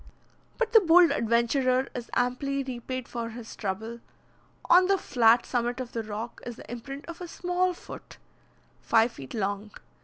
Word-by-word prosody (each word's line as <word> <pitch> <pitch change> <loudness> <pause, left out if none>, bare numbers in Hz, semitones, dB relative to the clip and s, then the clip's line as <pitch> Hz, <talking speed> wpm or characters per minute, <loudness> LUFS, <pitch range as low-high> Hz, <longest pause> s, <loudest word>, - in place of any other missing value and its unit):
But 480 -1 -1
the 450 - +10
bold 350 -2 +6
adventurer 250 +3 +2
is 245 -1 -6
amply 275 +3 0
repaid 255 -1 -5
for 235 -1 -4
his 230 0 -9
trouble. 220 +4 -4 0.7
On 365 +1 +6
the 390 0 +3
flat 235 -8 +4
summit 240 0 -1
of 250 -1 -5
the 230 - -3
rock 220 +2 -6
is 240 - -6
the - - -12
imprint 275 +4 -7
of 340 +1 -9
a 355 - -5
small 360 +2 0
foot, - - -11 0.6
five 225 +1 +3
feet 135 - -9
long. 205 0 -2
245 Hz, 160 wpm, -27 LUFS, 230-280 Hz, 0.7 s, the